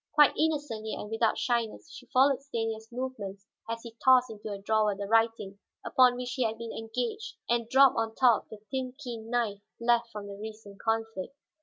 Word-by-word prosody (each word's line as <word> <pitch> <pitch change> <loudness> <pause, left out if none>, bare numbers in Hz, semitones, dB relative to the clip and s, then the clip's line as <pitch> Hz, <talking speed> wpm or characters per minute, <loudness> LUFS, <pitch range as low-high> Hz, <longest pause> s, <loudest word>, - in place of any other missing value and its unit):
Quite 295 -2 +6
innocently 290 -9 -1
and 210 - -7
without 225 0 +2
shyness 240 +4 -1
she 250 - -12
followed 270 +1 +4
Stanief's 225 -4 -4
movements 215 -6 -5 0.2
as 230 0 -4
he 230 -1 -10
tossed 255 -2 +6
into 215 0 -8
a 200 - -4
drawer 210 +1 +1
the 200 +1 -4
writing 225 -2 +1 0.3
upon 250 -1 +5
which 250 0 -4
he 260 - 0
had 225 -1 -1
been 230 0 -6
engaged 245 - -4
and 235 -1 0
dropped 270 +1 +6
on 225 -1 -1
top 245 -4 +4
the 220 - -9
thin, 260 -1 -3
keen 235 -5 -7
knife 230 -4 0 0.2
left 235 0 +2
from 210 -1 -7
the 200 - -7
recent 210 -1 -9
conflict. 225 0 -2
230 Hz, 185 wpm, -29 LUFS, 220-250 Hz, 0.3 s, Quite